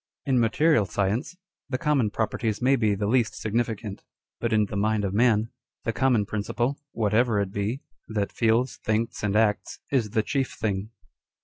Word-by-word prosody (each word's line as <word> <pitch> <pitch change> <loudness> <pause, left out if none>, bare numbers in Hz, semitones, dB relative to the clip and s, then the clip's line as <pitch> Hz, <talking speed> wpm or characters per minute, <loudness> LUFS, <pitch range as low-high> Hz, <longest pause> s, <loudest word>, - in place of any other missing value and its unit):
In 130 -3 +2
material 115 0 +3
science, 105 - -1 0.3
the 130 - -1
common 135 -5 +2
properties 110 0 -1
may 130 +2 +4
be 110 -5 +2
the 100 +1 -2
least 115 +1 +2
significant; 110 -2 -2 0.4
but 115 - -1
in 105 -1 +3
the 100 - -7
mind 105 +1 +1
of 95 - -2
man, 110 0 +3 0.3
the 115 - -1
common 125 -5 +2
principle 120 +6 -2
(whatever 110 0 +2
it 100 -2 -1
be) 105 +7 -2 0.2
that 105 -2 -2
feels, 115 +2 +1
thinks, 110 +1 -1
and 105 -1 0
acts, 105 -1 +1
is 125 -6 +1
the 110 +1 +1
chief 135 +1 -1
thing. 100 -1 -2
110 Hz, 170 wpm, -26 LUFS, 105-120 Hz, 0.4 s, may